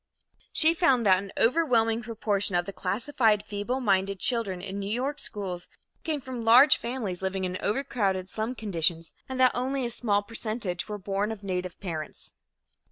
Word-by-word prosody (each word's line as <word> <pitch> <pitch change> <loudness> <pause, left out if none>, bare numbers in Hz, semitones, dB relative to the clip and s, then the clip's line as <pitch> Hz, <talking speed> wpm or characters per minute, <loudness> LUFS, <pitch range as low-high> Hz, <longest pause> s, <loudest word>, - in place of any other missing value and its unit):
She 320 +1 +5
found 270 -9 +2
that 185 -2 +5
an 195 0 -8
overwhelming 230 -4 +2
proportion 210 -4 0
of 175 0 +1
the 200 - -6
classified 210 +2 +1
feebleminded 205 -2 0
children 215 -4 +1
in 195 +2 -5
New 200 0 -4
York 265 +6 -2
schools 185 -4 -4 0.4
came 310 -2 -1
from 260 -3 -6
large 240 +6 +7
families 230 -7 -4
living 190 0 -2
in 185 0 -3
overcrowded 205 -5 -1
slum 220 +5 -4
conditions, 170 -6 0 0.2
and 260 0 -4
that 255 -1 +6
only 260 +1 -1
a 235 - -2
small 205 -4 0
percentage 215 -4 -4
were 210 - -3
born 200 +2 -2
of 210 -2 -8
native 180 -2 -4
parents. 160 -5 -6
210 Hz, 165 wpm, -27 LUFS, 190-245 Hz, 0.4 s, large